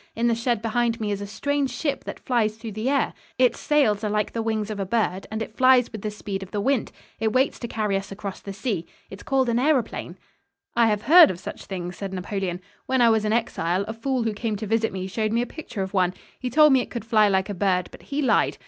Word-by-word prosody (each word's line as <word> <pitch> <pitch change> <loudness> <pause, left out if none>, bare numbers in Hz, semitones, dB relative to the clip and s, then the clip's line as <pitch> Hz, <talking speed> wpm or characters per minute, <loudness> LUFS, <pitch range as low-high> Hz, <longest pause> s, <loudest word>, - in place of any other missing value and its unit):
In 230 - 0
the 235 - +3
shed 230 -1 -1
behind 235 0 0
me 210 -2 -2
is 200 0 -2
a 200 - -5
strange 285 +5 -1
ship 285 -1 -3
that - - -6
flies 220 -4 0
through 225 0 -7
the 215 +5 -2
air. 280 -1 +1 0.2
Its 250 -1 +3
sails 230 -9 +2
are 210 - 0
like 210 0 -1
the 230 - -1
wings 220 -1 -1
of 210 - -5
a - - 0
bird, 195 -2 -1
and 220 +1 -3
it 220 - -11
flies 255 -1 +5
with 215 - -7
the 215 - -2
speed 205 -2 -5
of 190 - -8
the 205 - -3
wind. 260 +3 0 0.3
It 220 0 0
waits 260 +2 +2
to 235 - -4
carry 215 -3 -1
us 195 0 -3
across 195 -1 -6
the 200 - -8
sea. 195 -3 -3 0.2
It 195 - -8
is - - -12
called 265 -2 +1
an 235 0 +1
aëroplane." 265 -1 0 0.6
"I 235 -1 +5
have 210 -1 0
heard 330 +3 +8
of 175 - -4
such 190 - -8
things," 180 -2 -5
said 195 -1 -5
Napoleon. 185 -1 -3 0.3
"When 260 0 +1
I 235 -1 +6
was 220 -1 +2
in 210 - +1
exile, 200 -5 0
a 220 - -4
fool 250 +2 -1
who 225 -1 -1
came 215 +1 -2
to 210 +2 -5
visit 225 +1 +1
me 185 -1 -4
showed 215 +3 -1
me 235 +2 +2
a 245 - -10
picture 245 -10 -4
of 190 - -6
one. 185 -2 +2 0.2
He 250 - -3
told 300 +2 +6
me 260 - +5
it - - -6
could 235 -3 -6
fly 215 -2 +4
like 190 -1 +1
a - - -2
bird, 180 -2 +1
but - - -13
he 290 +1 -3
lied. - - +2
220 Hz, 265 wpm, -24 LUFS, 200-245 Hz, 0.6 s, heard